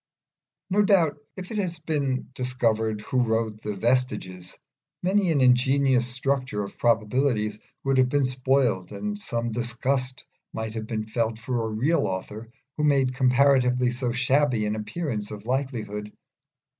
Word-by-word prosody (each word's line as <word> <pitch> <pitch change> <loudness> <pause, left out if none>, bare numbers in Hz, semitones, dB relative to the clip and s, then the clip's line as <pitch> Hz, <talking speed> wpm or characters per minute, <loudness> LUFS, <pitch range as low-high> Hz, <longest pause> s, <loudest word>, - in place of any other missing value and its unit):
No 205 +2 +4
doubt 185 -8 +3 0.2
if 185 +2 -7
it 215 - -2
had 175 -4 -2
been 140 -5 -1
discovered 115 -4 0
who 125 +4 0
wrote 110 -2 -1
the 105 -1 -4
'Vestiges,' 95 -6 -1 0.5
many 190 -1 +2
an 145 -4 +2
ingenious 130 0 +4
structure 130 -4 -1
of 100 - -8
probabilities 115 -1 +1 0.2
would 135 -1 +2
have 130 -1 +4
been 145 0 +2
spoiled, 130 -7 +1
and 210 0 -4
some 120 - -2
disgust 125 +3 -1 0.3
might 110 -1 -4
have 110 -1 -5
been 110 -1 -3
felt 110 0 -1
for 115 -1 -2
a - - -4
real 125 +10 +1
author 105 +4 -5 0.3
who 150 - -1
made 135 -3 +3
comparatively 125 -1 +3
so 125 0 -2
shabby 125 -1 +2
an 105 +1 -1
appearance 110 0 -4
of 105 0 -8
likelihood. 115 -6 -3
125 Hz, 145 wpm, -25 LUFS, 110-140 Hz, 0.5 s, No